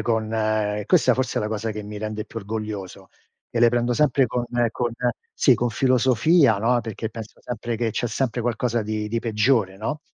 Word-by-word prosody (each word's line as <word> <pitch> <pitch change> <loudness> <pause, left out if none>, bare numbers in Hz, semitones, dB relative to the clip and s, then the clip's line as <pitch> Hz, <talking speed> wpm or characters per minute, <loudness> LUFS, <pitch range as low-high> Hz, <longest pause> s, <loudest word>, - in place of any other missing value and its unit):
con 110 0 0 0.6
questa 145 -5 +4
forse 125 0 -1
è - - -1
la 105 - -2
cosa 110 +1 -2
che 105 0 -6
mi 105 0 -7
rende 110 0 -4
più 115 - -7
orgoglioso, 105 -2 -6 0.4
e 120 - -1
le 120 - +7
prendo 120 +1 +1
sempre 140 0 +3
con 120 +1 -2 0.2
con 120 0 -2 0.4
sì, 130 - +5
con 120 +1 0
filosofia, 130 - +3
no, 120 +4 +2
perché 110 0 -5
penso 110 -1 -9
sempre, 120 0 -4
che 115 0 0
c'è 120 - -2
sempre 120 +1 -1
qualcosa 120 0 0
di 105 0 -3
di 115 +2 -1
peggiore, 110 -3 +1
no, 130 +9 -3
115 Hz, 190 wpm, -23 LUFS, 110-125 Hz, 0.6 s, le